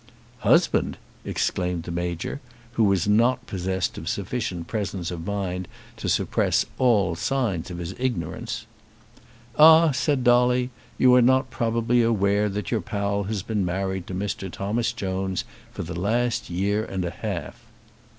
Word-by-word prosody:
"Husband!" -, -, +3 dB, 0.3 s
exclaimed 90 Hz, -2 st, -1 dB
the 85 Hz, -, -6 dB
Major; 85 Hz, -, -3 dB, 0.3 s
who 115 Hz, -1 st, +1 dB
was 100 Hz, -2 st, +2 dB
not 115 Hz, +5 st, +3 dB
possessed 95 Hz, +2 st, -2 dB
of 80 Hz, -, -5 dB
sufficient 100 Hz, -4 st, -3 dB
presence 95 Hz, -3 st, -3 dB
of 85 Hz, +1 st, -6 dB
mind 95 Hz, -3 st, -3 dB, 0.3 s
to -, -, -3 dB
suppress -, -, +1 dB
all 105 Hz, -9 st, +3 dB
signs 100 Hz, -3 st, -1 dB
of 90 Hz, -, -6 dB
his 85 Hz, +1 st, -5 dB
ignorance. 115 Hz, -1 st, -3 dB, 0.9 s
"Ah," 160 Hz, +1 st, +8 dB
said 130 Hz, 0 st, 0 dB
Dolly; 125 Hz, +1 st, +3 dB, 0.3 s
"you 125 Hz, -1 st, +5 dB
are 125 Hz, -, +7 dB
not 130 Hz, +1 st, +3 dB
probably 115 Hz, +1 st, +1 dB
aware 105 Hz, -2 st, +2 dB
that 100 Hz, -2 st, -4 dB
your -, -, +1 dB
pal 100 Hz, -2 st, -2 dB
has 100 Hz, -2 st, -3 dB
been 110 Hz, -2 st, -1 dB
married 95 Hz, 0 st, -2 dB
to 95 Hz, -, -5 dB
Mr. 95 Hz, -1 st, -3 dB
Thomas 110 Hz, +5 st, -1 dB
Jones 95 Hz, -4 st, -2 dB, 0.3 s
for -, -, -5 dB
the 85 Hz, +1 st, -5 dB
last 120 Hz, +5 st, 0 dB
year 100 Hz, +4 st, 0 dB
and 95 Hz, -4 st, -3 dB
a 85 Hz, -, -3 dB
half." -, -, -5 dB
100 Hz, 150 wpm, -24 LUFS, 90-120 Hz, 0.9 s, Ah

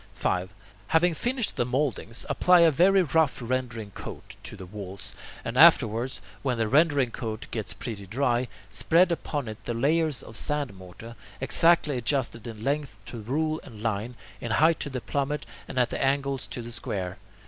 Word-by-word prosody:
5. 90 Hz, +1 st, -1 dB, 0.4 s
Having 170 Hz, +2 st, +3 dB
finished 240 Hz, -, -1 dB
the -, -, +3 dB
mouldings, 125 Hz, -2 st, -2 dB
apply 180 Hz, -1 st, +5 dB
a 165 Hz, -1 st, +6 dB
very 185 Hz, +5 st, +5 dB
rough 160 Hz, -1 st, +2 dB
rendering 120 Hz, -3 st, -3 dB
coat -, -, -9 dB
to -, -, -8 dB
the 95 Hz, -, -8 dB
walls, 100 Hz, 0 st, -7 dB, 0.3 s
and 115 Hz, +2 st, -3 dB
afterwards, 130 Hz, -6 st, +5 dB, 0.2 s
when 130 Hz, -3 st, 0 dB
the 115 Hz, -1 st, +1 dB
rendering 145 Hz, -1 st, +3 dB
coat 110 Hz, -3 st, -5 dB
gets 110 Hz, -5 st, -3 dB
pretty 105 Hz, -6 st, -6 dB
dry, 120 Hz, +2 st, +1 dB, 0.2 s
spread 170 Hz, -, +3 dB
upon 145 Hz, -5 st, -2 dB
it 110 Hz, 0 st, -8 dB
the 120 Hz, -, -2 dB
layers 155 Hz, +3 st, +1 dB
of 110 Hz, -, -9 dB
sand 145 Hz, -2 st, 0 dB
mortar, 95 Hz, +5 st, -11 dB, 0.2 s
exactly 150 Hz, +1 st, +4 dB
adjusted 120 Hz, -2 st, -1 dB
in 110 Hz, -2 st, -8 dB
length 140 Hz, -4 st, -1 dB
to 115 Hz, +1 st, -7 dB
rule 155 Hz, +7 st, -1 dB
and 110 Hz, -5 st, -11 dB
line, 115 Hz, +2 st, -2 dB, 0.2 s
in 120 Hz, -, -5 dB
height 160 Hz, +4 st, +4 dB
to -, -, -3 dB
the 130 Hz, -2 st, -4 dB
plummet, 145 Hz, +3 st, -2 dB, 0.2 s
and 130 Hz, -, -7 dB
at 125 Hz, -1 st, +2 dB
the -, -, -1 dB
angles 135 Hz, -1 st, 0 dB
to 120 Hz, -, -5 dB
the 120 Hz, -, -8 dB
square. 95 Hz, -5 st, -4 dB
130 Hz, 175 wpm, -27 LUFS, 115-150 Hz, 0.4 s, a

